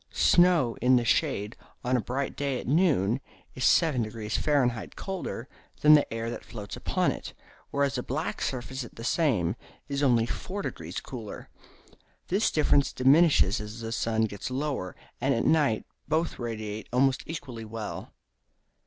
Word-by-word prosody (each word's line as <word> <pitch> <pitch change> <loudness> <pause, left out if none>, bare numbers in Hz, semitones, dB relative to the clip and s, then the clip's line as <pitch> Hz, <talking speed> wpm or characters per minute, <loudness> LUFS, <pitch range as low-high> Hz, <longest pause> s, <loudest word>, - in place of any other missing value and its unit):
Snow 175 -9 +4
in 125 +2 +5
the 120 -1 +2
shade 115 -5 +1 0.3
on 125 0 +1
a 125 - +2
bright 130 +6 -3
day 140 -3 -1
at - - -7
noon 135 - +2 0.3
is 130 - -5
7° 115 -10 +2
Fahr. 125 -6 +1
colder 185 - -5 0.3
than 150 0 +8
the 150 -1 +4
air 115 +1 -3
that - - -6
floats 105 -3 -8
upon - - 0
it, - - -7 0.3
whereas 140 -2 0
a - - -1
black 150 +7 -3
surface 130 +1 -3
at 120 - -12
the 115 - -8
same 115 - +1 0.3
is 140 0 -2
only 120 -5 +4
4° 120 - -5
colder. 115 -5 -8 0.8
This 200 +5 +2
difference 145 -2 +3
diminishes 135 - +4
as 105 +2 -7
the 115 0 -4
sun 115 -1 0
gets 105 0 -3
lower; 130 - -3 0.3
and - - +2
at - - 0
night 145 -9 +3 0.2
both 160 +2 0
radiate 110 -3 -5
almost 130 +2 +3
equally 130 -8 -6
well. 110 -1 -6
125 Hz, 155 wpm, -28 LUFS, 115-145 Hz, 0.8 s, than